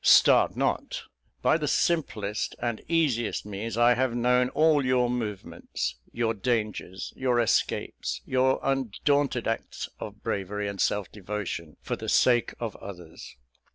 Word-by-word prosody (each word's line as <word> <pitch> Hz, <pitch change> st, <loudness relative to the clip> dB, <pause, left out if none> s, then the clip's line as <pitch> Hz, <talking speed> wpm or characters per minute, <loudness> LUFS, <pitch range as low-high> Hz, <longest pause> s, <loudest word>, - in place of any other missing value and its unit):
Start -, -, +6 dB
not! -, -, -1 dB, 0.4 s
By -, -, +4 dB
the -, -, -1 dB
simplest 110 Hz, -, 0 dB
and 120 Hz, -2 st, -2 dB
easiest 145 Hz, -12 st, +1 dB
means 105 Hz, +2 st, -5 dB
I 120 Hz, +1 st, +6 dB
have 125 Hz, 0 st, 0 dB
known 125 Hz, +1 st, +3 dB
all 155 Hz, -1 st, +3 dB
your 125 Hz, -1 st, +2 dB
movements 110 Hz, -5 st, -4 dB
your 115 Hz, -1 st, 0 dB
dangers, 105 Hz, -4 st, -2 dB
your 125 Hz, -2 st, +1 dB
escapes, 115 Hz, -, 0 dB
your 130 Hz, 0 st, +2 dB
undaunted 135 Hz, 0 st, +1 dB
acts 115 Hz, 0 st, -3 dB
of -, -, -8 dB
bravery 100 Hz, +1 st, -2 dB
and 100 Hz, -1 st, -3 dB
self 105 Hz, -2 st, 0 dB
devotion 100 Hz, -6 st, -5 dB
for -, -, -2 dB
the -, -, -5 dB
sake 120 Hz, -2 st, +3 dB
of 115 Hz, -4 st, -4 dB
others. 90 Hz, -9 st, -10 dB
120 Hz, 135 wpm, -27 LUFS, 105-130 Hz, 0.4 s, Start